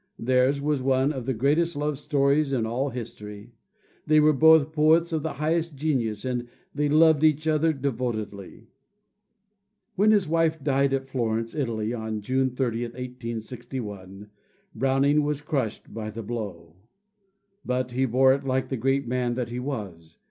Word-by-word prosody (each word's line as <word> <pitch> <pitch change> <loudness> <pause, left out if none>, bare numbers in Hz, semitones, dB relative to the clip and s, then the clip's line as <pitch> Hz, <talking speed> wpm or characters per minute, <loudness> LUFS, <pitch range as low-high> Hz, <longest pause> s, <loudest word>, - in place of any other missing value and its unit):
Theirs 130 +3 +2
was 145 -1 0
one 135 +2 +2
of 130 -3 -6
the 130 - +1
greatest 155 +8 +1
love 145 -1 -2
stories 140 -1 +1
in 120 -4 0
all 125 +5 -1
history. 110 -2 -8 0.5
They 155 0 +5
were 150 0 +5
both 160 +1 +5
poets 160 +2 +3
of 160 - 0
the 160 - -3
highest 160 +1 -1
genius, 130 -7 -1
and 125 -1 -2 0.3
they 145 0 0
loved 155 0 +5
each 155 0 +3
other 155 +1 +3
devotedly. 115 - -4 1.3
When 205 +3 +3
his 205 -5 +3
wife 160 -1 +1
died 140 -1 +2
at 135 0 -1
Florence, 115 -3 -2
Italy, 115 -6 -2
on 110 -2 -4
June 130 +4 0
30, 120 -2 -2
1861, 115 -5 -7 0.4
Browning 135 +3 +2
was 145 -1 -2
crushed 135 -8 -3
by 110 -1 -5
the 110 +1 -7
blow. 95 -8 -6 0.9
But 125 0 -2
he 130 +2 +1
bore 130 +2 +4
it 140 +1 -3
like 130 -1 -1
the 130 - -2
great 135 +2 0
man 125 0 -1
that 120 -2 -3
he 120 +1 -4
was. 95 - -6
130 Hz, 155 wpm, -25 LUFS, 115-150 Hz, 1.3 s, They